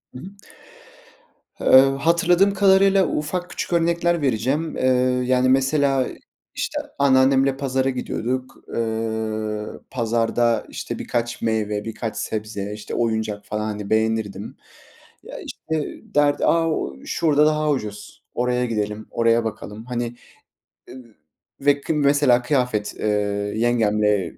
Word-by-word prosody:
Hı - - -7
hı. - - -11 1.4
Eee, - - -6 0.3
hatırladığım 175 +5 +3
kadarıyla 195 0 +4
ufak 175 +4 -3
küçük - - -4
örnekler 170 0 +1
vereceğim. 135 +5 -1
Eee, - - -2 0.4
yani, 130 0 +2
mesela 135 0 +2 0.5
işte - - -2 0.2
anneannemle 135 0 +4
pazara 135 -1 0
gidiyorduk. 130 0 -3 0.2
Eee, 110 -1 -3
pazarda 115 -1 +1
işte - - -6
birkaç 120 0 -3
meyve, 105 -2 -1
birkaç 115 0 -5
sebze, 105 -2 -4
işte 105 0 -8
oyuncak 110 -3 -1
falan, 105 +2 -3
hani, 105 -2 -5
beğenirdim. 110 -2 -1 0.7
Ya, - - -9
işte 160 -1 -4 0.3
derdi, 145 -1 +3
a, 165 -1 +3 0.4
şurada 150 -2 +2
daha 155 0 +1
ucuz, 105 -5 -5
oraya 125 0 0
gidelim, 105 -2 -3
oraya 115 0 +2
bakalım. 110 0 -6
Hani, 120 -1 -4 0.7
e, - - -10 0.7
ve 145 0 +3
kı 160 - -2
mesela 140 -4 +3
kıyafet, 125 -5 -1
eee, 110 - -1 0.5
yengemle 105 -4 +1
120 Hz, 115 wpm, -22 LUFS, 110-145 Hz, 1.4 s, kadarıyla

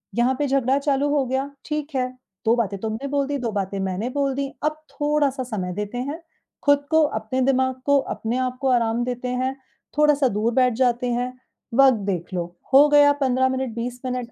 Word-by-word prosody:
यहाँ 240 +2 +3
पे 290 - +1
झगड़ा 270 0 +2
चालू 280 0 +1
हो 285 -2 +2
गया, 265 +2 -1 0.2
ठीक 300 -1 -4
है। 255 -1 +1 0.4
दो 225 +1 +4
बातें 210 -4 -1
तुमने 220 +6 -4
बोल 280 0 0
दी, 285 0 -1
दो 240 -4 -3
बातें 200 -1 -3
मैंने 190 +4 -2
बोल 275 +1 0
दी, 280 0 -1 0.2
अब 305 0 -1
थोड़ा-सा 290 -3 0
समय 200 -7 -4
देते 210 +4 -4
हैं 285 +7 -4 0.4
खुद 285 0 +3
को, 320 0 +5
अपने 240 -2 -1
दिमाग 260 0 +2
को, 285 0 +4
अपने 235 -2 -3
आपको 255 +1 -2
आराम 235 -1 +1
देते 245 0 -3
हैं, 255 +1 -1 0.4
थोड़ा-सा 295 -2 +4
दूर 225 +1 0
बैठ 250 0 +3
जाते 245 0 +1
हैं, 245 +1 -1 0.4
वक़्त 265 -1 +6
देख 180 -1 -3
लो, 175 -2 -1 0.3
हो 285 +2 +8
गया 290 -1 +6
15 260 -1 +2
मिनट, 260 -2 -2
20 245 +1 -4
मिनट, 250 -2 -3
255 Hz, 195 wpm, -23 LUFS, 235-280 Hz, 0.4 s, हो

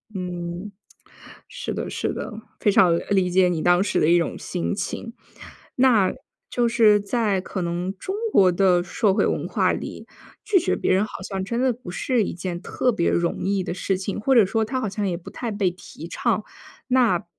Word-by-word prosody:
嗯。 180 +1 -5 0.8
是 - - -5
的 - - -4
是 - - -2
的， - - -5 0.3
非 205 - +3
常， 175 -3 +5
理 190 -2 +3
解 180 0 +4
你 165 -3 -1
当 175 +1 +4
时 200 - 0
的 - - +3
一 175 - +6
种 170 - -1
心 180 +1 -3
情。 230 +2 -5 0.6
那 235 -7 +4 0.4
就 240 -1 +1
是 220 -3 +5
在 205 -2 0
可 185 0 -5
能 175 +3 -3
中 380 - -4 0.2
国 185 -2 +6
的 180 -1 +3
社 195 +2 +1
会 - - +2
文 - - -1
化 - - +2
里， - - -6 0.4
拒 425 -3 +4
绝 350 - 0
别 - - +1
人 190 +2 +3
好 215 - -8
像 190 -1 -4
真 235 +5 -2
的 260 -1 +3
不 235 -6 -10
是 225 +4 0
一 - - -4
件 175 0 -5
特 250 - 0
别 170 -6 +1
容 170 0 0
易 195 0 +1
的 175 - -3
事 190 +1 -1
情， 190 +2 -4
或 265 +5 +2
者 230 -4 +7
说 220 +3 0
它 255 +4 -2
好 220 - -2
像 200 +1 -2
也 175 - -1
不 170 - -11
太 240 - -4
被 200 -3 0
提 170 -2 -11
倡。 215 +4 -1 0.4
那 245 -9 +3
195 Hz, 215 characters per minute, -23 LUFS, 180-225 Hz, 0.8 s, 者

